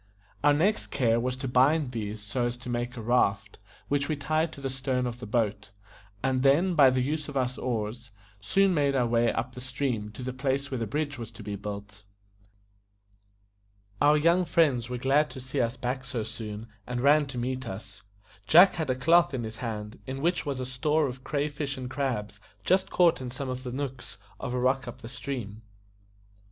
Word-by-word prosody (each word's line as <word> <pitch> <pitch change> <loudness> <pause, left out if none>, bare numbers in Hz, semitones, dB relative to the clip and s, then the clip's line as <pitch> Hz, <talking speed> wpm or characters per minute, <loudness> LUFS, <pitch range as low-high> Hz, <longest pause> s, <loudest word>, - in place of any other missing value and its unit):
Our 145 0 +6
next 185 +9 +1
care 115 -3 +2
was 125 +1 -1
to 130 +1 -5
bind 130 +3 +3
these 105 -3 -5
so 120 +4 -1
as 120 0 -4
to 125 0 -9
make 120 +1 -2
a 115 - -5
raft, 105 -4 +1 0.3
which 140 0 0
we 155 - +1
tied 155 +3 0
to - - -10
the 135 - -3
stern 130 -1 -1
of 120 0 -4
the 125 - -7
boat, 105 -3 -1 0.5
and 130 -1 +1
then, 150 +8 +4
by 145 -5 +7
the 130 0 +1
use 150 +2 -2
of 140 - -3
our 130 -1 +2
oars, 120 -1 -3 0.3
soon 195 - +3
made 140 -3 +2
our 125 -2 +3
way 115 0 +2
up 125 - -3
the 125 - -8
stream 125 -4 -2
to 125 - -8
the 130 0 -3
place 140 +1 -1
where 130 - -2
the 115 - -2
bridge 145 +3 -2
was 115 -2 -6
to 115 -1 -10
be 100 0 -4
built. 100 0 -7 2.0
Our 150 +1 +6
young 170 +4 +4
friends 140 -9 +2
were 125 - -3
glad 140 +4 +3
to 130 - -8
see 130 +2 -2
us 120 +2 -1
back 130 +2 -2
so 125 -3 -3
soon, 110 -1 -6 0.2
and 125 0 -2
ran 145 +2 +5
to 135 -2 -7
meet 130 +1 -2
us; 100 0 -8 0.5
Jack 180 +4 +8
had 160 -5 -3
a 130 - +2
cloth 165 +3 +4
in 120 - -3
his 110 0 -6
hand, 110 -2 -5
in 135 +2 -4
which 170 -2 +1
was 140 -2 -2
a 130 - -2
store 150 +4 +1
of 130 -1 -5
cray 145 0 -1
fish 145 -1 -4
and 130 -1 -6
crabs 110 -8 -2 0.2
just 190 +1 +2
caught 175 -6 +3
in 125 - -4
some 130 +2 -5
of 130 0 -4
the 125 -1 -5
nooks 125 -4 -5 0.2
of 125 -2 -3
a - - 0
rock 130 +1 +1
up 120 +1 -9
the - - -6
stream. 120 -4 -5
130 Hz, 210 wpm, -28 LUFS, 120-140 Hz, 2.0 s, Jack